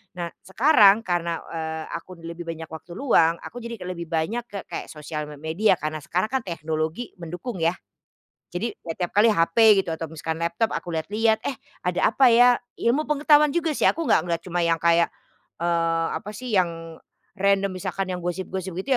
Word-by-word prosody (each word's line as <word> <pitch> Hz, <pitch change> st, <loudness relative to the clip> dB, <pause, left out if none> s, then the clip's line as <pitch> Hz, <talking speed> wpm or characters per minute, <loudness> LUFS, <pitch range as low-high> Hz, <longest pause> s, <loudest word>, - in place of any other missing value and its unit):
Nah 175 Hz, -1 st, -3 dB, 0.2 s
sekarang 220 Hz, -1 st, +5 dB
karena, 170 Hz, -3 st, -1 dB
eee, 160 Hz, -1 st, -4 dB
aku 185 Hz, +2 st, -7 dB
d 165 Hz, -, -16 dB
lebih 170 Hz, +1 st, -7 dB
banyak 165 Hz, -1 st, -5 dB
waktu 160 Hz, +2 st, -10 dB
luang 170 Hz, -11 st, +3 dB
aku 245 Hz, 0 st, -9 dB
jadi 235 Hz, -2 st, -6 dB
k 180 Hz, -, -7 dB
lebih 170 Hz, -2 st, -6 dB
banyak 190 Hz, +10 st, -1 dB
ke 205 Hz, -4 st, -7 dB
kayak -, -, -6 dB
sosial 150 Hz, 0 st, -5 dB
me 150 Hz, -1 st, -10 dB
media 165 Hz, +3 st, +2 dB
karena 155 Hz, +1 st, -3 dB
sekarang 180 Hz, +7 st, -1 dB
kan 265 Hz, -, +1 dB
teknologi 160 Hz, +5 st, -3 dB
mendukung, 180 Hz, +5 st, -6 dB
ya. 165 Hz, +2 st, +2 dB, 0.8 s
Jadi 215 Hz, +7 st, -3 dB
ya 165 Hz, -, -5 dB
tiap 175 Hz, 0 st, -3 dB
kali 215 Hz, +2 st, +6 dB
HP 205 Hz, +4 st, +5 dB
gitu 170 Hz, -4 st, 0 dB
atau 160 Hz, -1 st, -6 dB
misalkan 160 Hz, 0 st, -4 dB
laptop 170 Hz, +7 st, 0 dB
aku 175 Hz, -, -4 dB
lihat-lihat, 215 Hz, +7 st, +1 dB
"Eh, 275 Hz, -, -1 dB, 0.3 s
ada 180 Hz, +2 st, +2 dB
apa 265 Hz, +3 st, +4 dB
ya?" 245 Hz, +1 st, +6 dB, 0.2 s
Ilmu 270 Hz, +7 st, +1 dB
pengetahuan 300 Hz, 0 st, +4 dB
juga 335 Hz, -2 st, +1 dB
sih 295 Hz, -, +1 dB
aku 330 Hz, -, +2 dB
nggak 165 Hz, -, +4 dB
ngelihat 170 Hz, -1 st, -1 dB
cuma 175 Hz, -1 st, -3 dB
yang 170 Hz, -1 st, +3 dB
kayak, 170 Hz, 0 st, +4 dB, 0.6 s
eee, 165 Hz, -1 st, +1 dB
apa 210 Hz, -, -9 dB
sih, 250 Hz, +3 st, -6 dB
yang 165 Hz, -2 st, -2 dB, 0.4 s
random 195 Hz, 0 st, +2 dB
misalkan 185 Hz, +1 st, -4 dB
yang 180 Hz, -, -2 dB
gosip-gosip 185 Hz, +1 st, -4 dB
gitu 190 Hz, +9 st, -5 dB
175 Hz, 190 wpm, -24 LUFS, 165-220 Hz, 0.8 s, kali